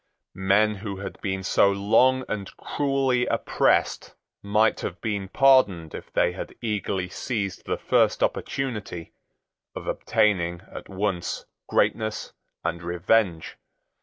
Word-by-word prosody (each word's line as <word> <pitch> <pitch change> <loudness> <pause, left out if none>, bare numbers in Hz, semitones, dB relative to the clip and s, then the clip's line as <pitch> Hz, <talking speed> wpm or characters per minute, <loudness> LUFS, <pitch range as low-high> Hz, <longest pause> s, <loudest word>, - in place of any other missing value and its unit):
Men 100 +3 +3
who 100 -1 -5
had 100 - -7
been 95 -1 -2
so 100 +1 +4
long 125 +6 +3
and 100 -2 -4
cruelly 135 -3 0
oppressed - - +1 0.3
might 105 +2 +2
have 90 -1 -5
been 100 -2 -2
pardoned 100 - +4
if - - -9
they - - +2
had 90 - -7
eagerly 100 -5 -2
seized 100 -3 -4
the - - -1
first - - +2
opportunity 105 -10 -3 0.6
of - - -6
obtaining 95 -6 +1
at - - -9
once 95 -2 -2 0.2
greatness 110 -1 0 0.3
and 85 +1 -2
revenge. 90 0 0
100 Hz, 120 wpm, -25 LUFS, 95-110 Hz, 0.6 s, so